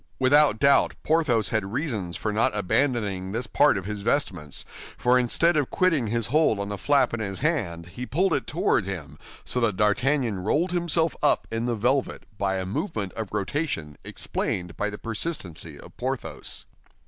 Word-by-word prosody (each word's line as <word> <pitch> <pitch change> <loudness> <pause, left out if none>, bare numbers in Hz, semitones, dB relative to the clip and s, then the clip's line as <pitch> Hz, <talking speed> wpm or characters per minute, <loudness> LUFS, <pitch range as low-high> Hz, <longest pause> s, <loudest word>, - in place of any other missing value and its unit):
Without 140 -2 +5
doubt, 140 +3 +4
Porthos 125 -10 +2
had 110 -4 -1
reasons 115 - -2
for 105 - -2
not 105 -1 +2
abandoning 100 -3 0
this 115 +2 -1
part 105 - +3
of 95 - -5
his 105 0 -4
vestments, 95 - -1 0.3
for 125 +1 +4
instead 165 +8 +3
of 145 -4 +1
quitting 165 -10 +2
his 115 +1 0
hold 140 -5 +2
on 100 0 -3
the 105 - -4
flap 140 +1 +3
in 115 - -2
his 100 -3 -3
hand, 100 - -1
he 125 +8 -7
pulled 185 +6 +1
it - - -1
toward 165 - +1
him, 90 -7 -6 0.3
so 125 - +1
that 110 -6 +1
D'Artagnan 120 +1 +1
rolled 155 - +1
himself 170 -2 +1
up 150 - +3
in 115 +1 -1
the 120 - 0
velvet 125 +5 0 0.2
by 95 -1 0
a 95 -1 -2
movement 100 - -3
of 110 -3 -5
rotation 100 - -2
explained 90 -2 -3
by 105 - -1
the 105 - -7
persistency 100 - -4
of - - -14
Porthos. - - -4
115 Hz, 175 wpm, -25 LUFS, 100-145 Hz, 0.3 s, Without